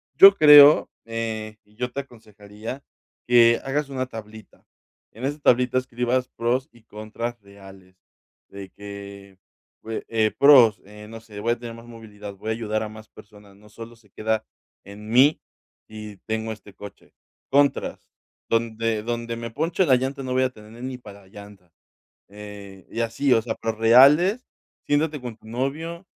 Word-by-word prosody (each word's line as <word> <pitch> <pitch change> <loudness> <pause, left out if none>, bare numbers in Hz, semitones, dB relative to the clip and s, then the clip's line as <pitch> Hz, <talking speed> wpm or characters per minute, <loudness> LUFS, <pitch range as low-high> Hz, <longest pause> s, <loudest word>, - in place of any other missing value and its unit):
yo 195 +1 +9
creo, 150 -2 +8 0.2
eh, 110 -1 -5
y 105 0 -27
yo 125 +2 -4
te 140 - -4
aconsejaría 110 0 -11 0.4
que 115 -1 +5
hagas 140 +1 -2
una 130 -1 -3
tablita, 110 -2 -12 0.5
en 115 +5 -7
esa 145 +2 -3
tablita 125 -2 +2
escribas 125 0 -1
pros 125 +3 -2
y 120 - -22
contras 115 +2 -7
reales 95 -2 -17 0.5
de 100 -1 -10
que, 100 -1 -11 0.4
pue 110 0 -6
eh, 110 -1 +1
pros, 130 -7 +6
eh, 105 +1 -13
no 115 0 -9
sé, 105 -2 -11
voy 115 +3 0
a 120 - -9
tener 115 -1 -8
más 115 0 -13
movilidad, 105 -3 -11
voy 105 +3 -7
a - - 0
ayudar 110 -1 -3
a 110 - -6
más 110 0 -13
personas, 105 -2 -17
no 105 +1 -20
solo 115 +2 -11
se 110 -3 -26
queda 110 +2 -2 0.4
en 105 +2 -12
mí 130 +6 +4 0.5
y 105 -1 -10
tengo 110 0 -3
este 105 -2 -11
coche. 100 0 -13 0.4
Contras, 140 +1 0 0.4
donde 115 -1 -1
donde 120 0 -4
me 115 0 -7
ponche 165 +8 0
la 135 -5 +4
llanta 135 +2 -3
no 130 - -4
voy 130 0 +2
a 130 - +1
tener 110 0 -14
ni 130 0 -5
para 100 -5 -14
llanta, 100 -3 -15 0.6
eh, 100 -2 -12
y 115 - -5
así, 115 +4 +1
o 115 - +3
sea, 110 0 -4
pero 115 -1 -4
reales, 140 - +5 0.4
siéntate 150 0 0
con 120 -3 -8
tu 110 - -19
novio 155 +9 -4
115 Hz, 165 wpm, -23 LUFS, 105-130 Hz, 0.6 s, yo